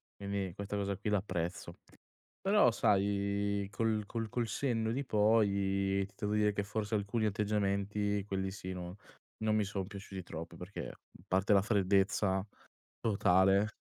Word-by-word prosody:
quindi 100 -2 -3
questa 100 0 -4
cosa 100 -1 -1
qui 105 - -3
la 105 - +4
apprezzo. 90 -3 -3 0.7
Però 195 - +5
sai, 100 -1 +1
col 110 0 0
col 115 +1 -3
col 120 0 -1
senno 115 -2 0
di 135 +3 -2
poi, 100 -3 +2
ti 105 - -24
devo 105 -1 -1
dire 105 0 +3
che 100 - -1
forse, 105 +1 -2
alcuni 105 +2 0
atteggiamenti 100 0 0
quelli 95 -1 -2
sì 95 -1 -6
non 90 0 -6 0.5
non 110 0 +2
mi 105 - +3
sono 100 -1 -3
piaciuti 100 -1 -7
troppo 85 0 -7
perché, 90 +3 -6
a - - -12 0.3
parte 95 +3 +3
la 100 - +6
freddezza 95 -1 +2 0.6
totale 100 -1 +4
100 Hz, 150 wpm, -33 LUFS, 95-105 Hz, 0.7 s, la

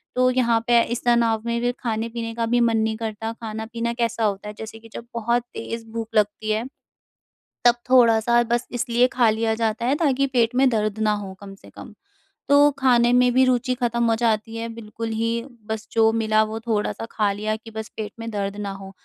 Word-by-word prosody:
तो 255 0 +4
यहाँ 235 -3 +2
पे 235 -1 +5
इस 240 +1 -4
तनाव 235 -2 +3
में 235 0 0
भी 245 0 +1
खाने-पीने 230 0 -3
का 230 0 -1
भी 240 +1 +2
मन 230 -1 +3
नहीं 220 0 0
करता। 225 0 -4
खाना-पीना 230 +1 -4
कैसा 235 -1 -1
होता 200 0 -2
है 210 - -7
जैसे 220 0 -8
कि 225 0 -16
जब 235 - -7
बहुत 235 +1 0
तेज़ 230 0 -6
भूख 225 -1 -4
लगती 210 +1 +1
है, 220 +3 0 1.0
तब 240 - +7
थोड़ा-सा 235 -2 +5
बस 240 +1 -1
इसलिए 245 0 +2
खा 240 -3 +4
लिया 220 0 0
जाता 225 +1 -1
है 265 +3 +2
ताकि 275 -3 +1
पेट 245 -2 +1
में 265 +1 +4
दर्द 215 -2 -1
ना 215 -1 +2
हो 200 -2 -5
कम 195 -1 -10
से - - -17
कम। - - -11 0.6
तो 285 +1 +6
खाने 240 -2 +4
में 250 0 +4
भी 260 +1 +5
रुचि 255 0 +1
ख़त्म 235 -1 0
हो - - +3
जाती 225 -1 0
है 230 0 -4
बिल्कुल 230 0 -6
ही। 230 +1 -1 0.3
बस 220 0 -4
जो 225 -1 +4
मिला 220 -1 +2
वो 220 +1 -4
थोड़ा-सा 225 0 -2
खा 210 -2 +1
लिया 215 +2 -2
कि 220 +1 -12
बस 220 0 -6
पेट 215 -1 -4
में 230 0 -5
दर्द 200 -1 -3
ना 200 -1 -3
हो, 195 0 -10
230 Hz, 210 wpm, -23 LUFS, 220-240 Hz, 1.0 s, तब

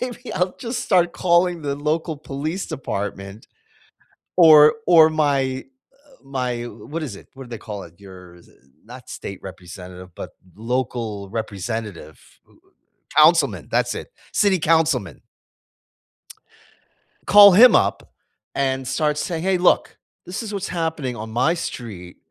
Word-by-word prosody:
maybe 250 0 -6
I'll 180 0 -1
just 235 0 -4
start 175 -3 +2
calling 175 -1 +1
the 140 -1 -2
local 155 +3 -2
police 155 +6 -5
department 100 -3 -6 0.9
or 155 -3 +8
or 160 -3 +7
my, 140 -4 0 0.3
uh 280 -1 -26
my 125 -3 -3
w 120 - -9
what 165 +3 -5
is 130 -10 -5
it? - - -15
What 135 0 -11
do - - -15
they 115 - -6
call 105 -2 -8
it? 85 0 -16
Your 90 -3 -14
s 85 - -20
uh, - - -23 0.3
not 125 +1 -13
state 100 - -8
representative, 90 -1 -11
but - - -8 0.3
local 115 -3 -3
representative 105 - -5 1.0
councilman. 160 +2 +4
That's - - 0
it, - - -7 0.2
city 195 -4 +2
councilman. 155 -9 +1 2.1
Call 205 0 +9
him 230 +6 +8
up - - +1 0.4
and 135 -1 -1
start 150 +3 -1
saying, 165 +1 -3
"Hey, 190 0 +1
look, 180 - +2 0.3
this 185 +6 -5
is 215 -2 -7
what's 200 -1 -4
happening 160 -7 -3
on 110 0 -7
my 125 +9 +1
street. 105 - -7
140 Hz, 140 wpm, -21 LUFS, 110-170 Hz, 2.1 s, Call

